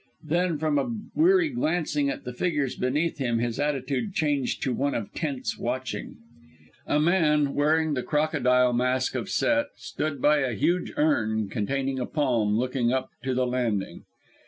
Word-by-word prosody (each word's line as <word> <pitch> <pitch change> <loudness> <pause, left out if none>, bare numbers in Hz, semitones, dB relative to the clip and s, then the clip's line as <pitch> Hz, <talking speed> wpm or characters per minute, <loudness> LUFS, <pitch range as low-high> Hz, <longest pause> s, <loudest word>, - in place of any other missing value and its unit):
Then, 170 +1 0
from 150 -1 +1
a 140 - -2 0.2
weary 350 +1 +4
glancing 160 - 0
at 135 - -4
the 125 - -6
figures 145 -2 -1
beneath 150 +6 -1
him, 120 -3 0
his 120 0 -2
attitude 145 +5 -1
changed 145 -3 0
to 130 - 0
one 140 +4 0
of 110 -4 -4
tense 135 -7 -3
watching. 130 +2 -4 0.7
A 150 - +2
man, 150 -4 +3
wearing 155 +1 +2
the 130 - -1
crocodile 125 -5 +2
mask 125 +1 +1
of 195 - -3
Set, 290 +8 +2
stood 155 -3 -4
by 150 +3 +4
a 130 -4 -1
huge 175 - 0
urn 110 -9 +1
containing 130 +5 -2
a 125 - -2
palm, 120 -8 +1
looking 125 0 0
up 130 0 -1
to 130 -1 0
the 130 0 +2
landing! 120 -6 -2
140 Hz, 160 wpm, -26 LUFS, 125-155 Hz, 0.7 s, weary